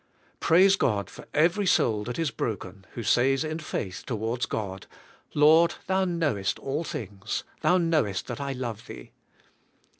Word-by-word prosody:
Praise 190 +4 +5
God 105 - 0
for - - -12
every 175 +6 +2
soul 110 -10 +3
that 120 - -4
is 165 -4 0
broken, 95 -3 -5
who 120 - -5
says 135 +6 +3
in 155 +1 -3
faith 100 - -4
towards 115 0 -2
God, 95 -3 -4 0.5
"Lord, 160 +3 +6
Thou 190 0 +1
knowest 155 - 0
all 145 +4 -3
things. 110 - -4 0.2
Thou 180 - +4
knowest 155 - +1
that - - -5
I 140 -1 -2
love 120 -4 -5
Thee." - - -10
135 Hz, 150 wpm, -27 LUFS, 110-165 Hz, 0.5 s, Lord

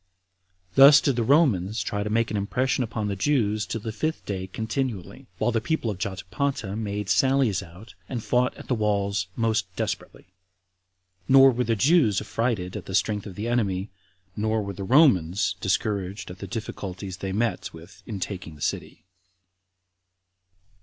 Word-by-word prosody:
Thus 140 +2 +9
did 140 -3 +1
the 120 - 0
Romans 110 - +2
try 105 - -2
to 105 - -2
make 115 +1 +1
an - - -2
impression 130 +6 0
upon 110 -2 -3
the 100 - -2
Jews 105 -3 +1
till 110 +4 -4
the 110 - -4
fifth 155 +9 -3
day 95 -2 -4
continually, 110 +1 -4
while 115 +3 +1
the 115 -1 0
people 140 -4 -1
of 95 - -7
Jotapata 100 +3 -3
made 105 -2 -3
sallies 130 -3 +2
out, 90 +7 -13 0.2
and 120 -4 -4
fought 125 0 +1
at - - -11
the - - +1
walls 100 -3 0
most 115 -3 0
desperately; 90 - -5 0.9
nor 135 0 +7
were 125 0 -1
the 115 0 +1
Jews 130 - +3
affrighted 105 -4 -2
at - - -7
the 95 - -3
strength 105 +1 0
of 95 - -9
the 105 +4 -4
enemy, 100 -5 -1 0.4
nor 110 0 0
were 100 0 -5
the 100 +1 -6
Romans 100 - +4
discouraged 100 -2 -2
at 90 - -11
the 100 - -6
difficulties 95 -2 -6
they 95 0 -4
met 115 +4 -1
with 85 +4 -14
in 105 -4 -5
taking 90 -4 -5
the 75 - -16
city. - - -3
105 Hz, 165 wpm, -25 LUFS, 95-120 Hz, 0.9 s, Thus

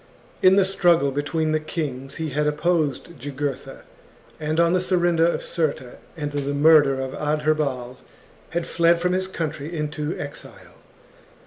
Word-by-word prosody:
In 185 +1 +6
the 195 -1 +4
struggle 175 -7 +3
between 155 +3 -1
the 155 - +2
kings 140 -4 -5
he 160 -1 -3
had 150 +2 -1
chap. 150 0 0
opposed 160 -1 -1
Jugurtha, 140 0 -5 0.6
and, 155 +1 -1
on 170 0 +4
the 185 - +2
surrender 175 -3 +2
of 170 - -1
Cirta 140 -6 -3 0.2
and 145 -2 -4 0.3
murder 145 -3 +5
of 130 0 -4
Adherbal, 150 -4 -1 0.5
had 170 0 -2
fled 170 0 +3
from 180 +1 0
his 185 0 -1
country 155 -4 -4
into 150 +1 -3
exile. - - -9
155 Hz, 145 wpm, -23 LUFS, 145-170 Hz, 0.6 s, In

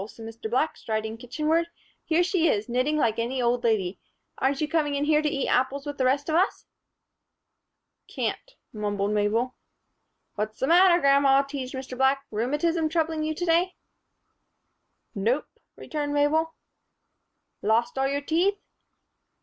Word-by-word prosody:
said 225 0 -11
Mr. 225 0 -7
Black, 260 +7 0
striding 220 0 -3
kitchenward, 305 +8 -1 0.4
"here 330 +2 +2
she 350 -2 +1
is, 210 -5 0
knitting 255 +5 0
like 230 -6 +1
any 245 +3 -2
old 245 0 +1
lady. 205 -5 0 0.4
Aren't 270 +1 +1
you 305 - 0
coming 295 -3 0
in 285 +1 0
here 300 0 +3
to 305 - 0
eat 275 -2 -2
apples 265 +3 0
with 290 -1 -6
the 260 - +2
rest 275 +3 +1
of 315 - -1
us?" 360 +5 +1 1.4
"Can't," - - -4 0.2
mumbled 205 -1 -2
Mabel. 215 +4 0 0.8
"What's 215 +1 -4
the - - +1
matter, 350 +3 +6
grandma?" 275 -1 +4
teased 275 -2 -6
Mr. 260 -1 -6
Black. 265 +1 +2
"Rheumatism 295 +9 0
troubling 320 -1 0
you 310 0 -2
to 350 - -3
day?" 345 +2 +2 1.4
"Nope," 235 +7 0 0.3
returned 290 -1 -4
Mabel. 315 +3 +1 1.1
"Lost 225 +3 +1
all 270 0 +1
your 280 +1 -1
teeth?" 350 +7 +1
275 Hz, 150 wpm, -26 LUFS, 235-315 Hz, 1.4 s, matter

